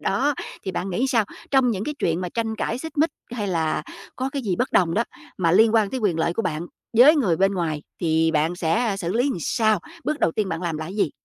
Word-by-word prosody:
Đó, 275 +8 +1 0.3
thì 190 - -2
bạn 190 +2 -3
nghĩ 240 +9 0
sao, 230 -5 +2 0.3
trong 265 -3 +4
những 205 -1 -2
cái 300 - -3
chuyện 165 +2 0
mà 180 - -3
tranh 225 +2 -2
cãi, 235 - -2
xích 320 0 -7
mích 315 +2 +3 0.2
hay 210 -5 -2
là 160 -3 0 0.3
có 260 +1 -2
cái 275 -2 -3
gì 190 -5 -1
bất 250 +2 -1
đồng 170 -3 +3
đó 230 - +2 0.3
mà 170 -3 +2
liên 220 +3 +5
quan 215 -3 +3
tới 260 - -3
quyền 185 -7 +1
lợi 170 +1 +1
của 225 - -1
bạn 170 -2 -2 0.3
với 295 +6 +8
người 195 - +2
bên 195 +1 +3
ngoài, 160 -5 -2 0.2
thì 160 -1 +2
bạn 160 +3 +1
sẽ 200 +6 +1
xử 175 -1 -2
lý 235 - +2
làm 185 - -3
sao, 215 0 +2 0.2
bước 305 0 -1
đầu 165 - +2
tiên 210 0 -1
bạn 165 +1 -3
làm 165 -3 -2
là 155 - -4
cái 190 +5 -7
gì? 180 - +2
195 Hz, 260 wpm, -23 LUFS, 170-235 Hz, 0.3 s, với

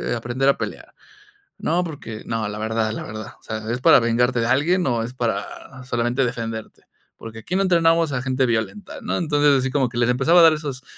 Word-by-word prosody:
aprender 120 +3 -2
a 140 - +4
pelear?', - - -7 0.6
'No, 180 -4 0
porque' 125 -9 -8
'No, 115 -1 -2
la 105 - -6
verdad, 110 0 -1
la 110 - -5
verdad'. 110 0 -8
O - - -30
sea, 110 0 -5
'¿es 120 - -2
para 125 - +6
vengarte 120 +1 +1
de 115 - 0
alguien, 160 +9 +2
o 120 -2 0
es 120 +2 -6
para 115 -5 -1 0.4
solamente 120 +2 0
defenderte?', 115 -2 -5 0.3
porque 115 0 -10
aquí 175 +11 -5
no 195 - +2
entrenamos 165 -4 +3
a 125 - -2
gente 130 0 0
violenta", 120 - -3
¿no?, - - -2
entonces, 145 -4 +3
así 130 0 -2
como 135 -2 +1
que 120 - -8
les 120 0 +2
empezaba 135 +8 +4
a - - +7
dar 165 - +8
esos 145 -4 -5
125 Hz, 215 wpm, -22 LUFS, 115-145 Hz, 0.6 s, dar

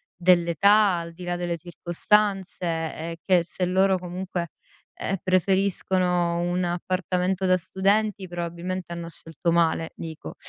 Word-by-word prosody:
dell'età, 180 +3 +4
al 170 0 -6
di 180 +2 -11
là 175 0 -2
delle 175 -1 -2
circostanze 185 +3 0
e 165 0 -3
che 180 -3 +4
se 180 +1 -2
loro 190 +1 +3
comunque, 180 -1 -4 0.5
uhm, 195 - -1
preferiscono 185 -2 +1
un 175 +1 0
appartamento 185 +1 -1
da 185 0 +4
studenti 195 +2 0
probabilmente 175 +1 -4
hanno 170 -1 -6
scelto 165 +1 -3
male, 165 -1 +2
dico. 160 -1 -8
180 Hz, 125 wpm, -25 LUFS, 170-190 Hz, 0.5 s, dell'età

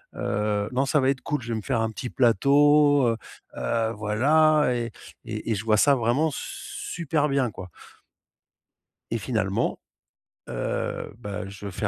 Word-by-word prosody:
Heu, 105 0 -1
non, 135 +2 +1
ça 150 - +3
va 130 0 +2
être 130 - -4
cool, 150 -3 -2
je 120 - -8
vais - - -1
me - - -4
faire 120 -4 0
un 110 0 -1
petit 125 +2 -6
plateau, 145 +3 +4
heu 115 - -1 0.4
heu, 115 -1 0
voilà» 150 +9 +3
et 115 -1 -3 0.3
et 110 0 -4
et - - +2
je 100 - -4
vois 110 -1 +3
ça 140 +6 +5
vraiment 130 +7 +1
super 150 +2 -3
bien, 135 -5 +1
quoi. 90 -1 -9 1.4
Et 115 - 0
finalement, 105 -4 -1 0.7
heu, - - -3
bah, 100 -4 -6
je 100 +1 -8
fais 105 +2 -2
120 Hz, 160 wpm, -25 LUFS, 105-140 Hz, 1.4 s, ça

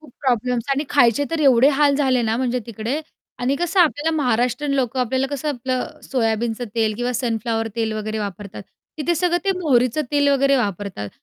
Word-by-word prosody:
खूप 300 -6 -17
प्रॉब्लेम्स 245 -2 0
आणि 280 +2 0
खायचे 265 0 +4
तर 330 -1 -1
एवढे 265 -2 +5
हाल 285 -1 +5
झाले 260 -4 +2
ना, 225 0 0
म्हणजे 250 -1 0
तिकडे. 230 +6 -3 0.4
आणि 255 +3 0
कसं 350 +3 +1
आपल्याला 315 -1 +2
महाराष्ट्रीयन 250 +1 0
लोकं 260 -1 0
आपल्याला 260 +2 0
कसं 285 +2 -3
आपलं 260 +2 -3
सोयाबीनचं 230 -1 -1
तेल 220 -2 +1
किंवा 245 +1 -1
सनफ्लॉवर 225 -2 -1
तेल 225 -1 -1
वगैरे 215 0 -3
वापरतात. 200 -1 -6 0.4
तिथे 325 +3 0
सगळं 350 +1 +1
ते 390 - +2
मोहरीचं 255 -3 +2
तेल 285 -1 +3
वगैरे 275 0 +3
वापरतात. 200 - -3
250 Hz, 175 wpm, -21 LUFS, 225-285 Hz, 0.4 s, एवढे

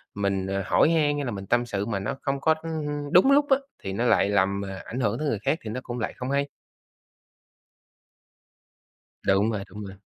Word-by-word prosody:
mình 100 -1 -1 0.2
hỏi - - +4
han 155 -3 +2
hay 145 - -2
là 120 - -2
mình 100 -2 -6
tâm 120 +3 +2
sự 100 -4 -2
mà 105 -3 -2
nó 105 +6 -3
không 140 0 -2
có 160 +1 +4 0.6
đúng 185 +10 +6
lúc 285 +1 +5
á, 270 - +6 0.3
thì 95 - -4
nó 115 +5 0
lại 110 - +4
làm 100 0 +2 0.2
ảnh 125 - -5
hưởng 115 -2 0
tới 155 - -1
người 110 -7 0
khác 150 - 0
thì 110 - -6
nó 125 - -3
cũng 120 0 -5
lại 115 - -2
không 125 +1 -4
hay. 140 0 +1 2.8
Đúng 100 +3 +3
rồi, 105 -3 -3
đúng 105 +3 -8
rồi. 95 0 -10
115 Hz, 200 wpm, -26 LUFS, 100-140 Hz, 2.8 s, đúng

